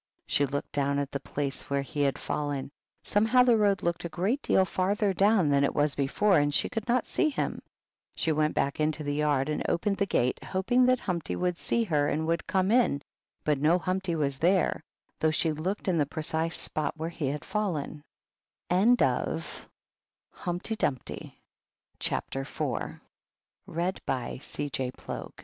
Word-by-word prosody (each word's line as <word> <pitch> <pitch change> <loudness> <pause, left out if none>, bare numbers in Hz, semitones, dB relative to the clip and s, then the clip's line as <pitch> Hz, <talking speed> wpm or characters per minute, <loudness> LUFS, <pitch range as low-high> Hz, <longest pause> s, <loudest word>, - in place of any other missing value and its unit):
She 145 - +2
looked 145 +2 -4
down 140 0 0
at 140 -1 -2
the 140 - -2
place 140 -1 -4
where 140 0 0
he 145 +2 -4
had 140 -1 +2
fallen; 145 -2 -3 0.3
somehow 225 +5 +4
the 245 -2 +5
road 205 -2 +2
looked 170 0 -1
a 170 - -3
great 195 - 0
deal 190 - +3
farther 195 +3 +1
down 195 -3 +4
than 140 0 +3
it 140 - +1
was 145 -1 +2
before, 180 +7 +3
and 145 0 +2
she - - +1
could 225 -2 -4
not 245 0 +2
see 320 - +1
him. 290 - -2 0.5
She 160 - 0
went 155 0 +1
back 140 +2 0
into 155 0 0
the 145 0 -1
yard 145 -2 +1
and 150 - -1
opened 195 +3 0
the 200 - +1
gate, 125 -8 0
hoping 245 +7 +2
that 255 -1 +3
Humpty 180 -4 -2
would 180 -1 -1
see 235 - +1
her 150 -8 +1
and 155 +2 -1
would 165 +1 -1
come 190 0 +1
in, 230 - +3 0.4
but 150 -2 +1
no 155 +5 +4
Humpty 185 -1 -1
was 140 -4 -1
there, 180 -1 +2 0.4
though 160 - +3
she 155 +1 +1
looked 180 +8 -3
in 175 -3 +2
the 145 - +2
precise 160 +2 -1
spot 155 - -2
165 Hz, 145 wpm, -28 LUFS, 145-195 Hz, 0.5 s, the